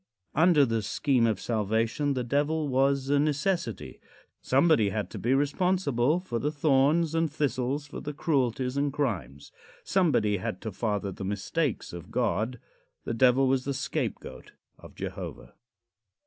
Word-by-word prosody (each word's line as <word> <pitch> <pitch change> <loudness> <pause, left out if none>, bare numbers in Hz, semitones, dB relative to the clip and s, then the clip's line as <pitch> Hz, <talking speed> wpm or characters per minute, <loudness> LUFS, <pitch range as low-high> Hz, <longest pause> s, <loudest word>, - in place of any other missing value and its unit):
Under 160 -2 +5
the 115 -2 -1
"Scheme 120 +3 +1
of 110 -4 0
Salvation" 115 +7 0
the 125 - -1
Devil 145 +5 0
was 135 0 +1
a 145 - +4
necessity. 145 - -1 0.4
Somebody 135 -6 +3
had 105 +2 -3
to - - -6
be 125 +4 +2
responsible 145 -1 +1
for 125 -11 -4
the 150 - -1
thorns 150 +2 +2
and 165 -2 +1
thistles, 140 -1 -1
for 145 - -8
the 150 - -4
cruelties 130 -4 0
and 140 0 +1
crimes. 85 - -3 0.3
Somebody 145 - +2
had 90 0 -4
to 110 - -4
father 105 0 -2
the 95 - -7
mistakes 105 - -2
of 85 0 -8
God. 120 0 -1 0.4
The - - -3
Devil 130 +3 +4
was 130 0 +1
the 140 0 -3
scapegoat 135 -3 -4 0.3
of - - -14
Jehovah. - - -7
135 Hz, 150 wpm, -28 LUFS, 115-145 Hz, 0.4 s, Under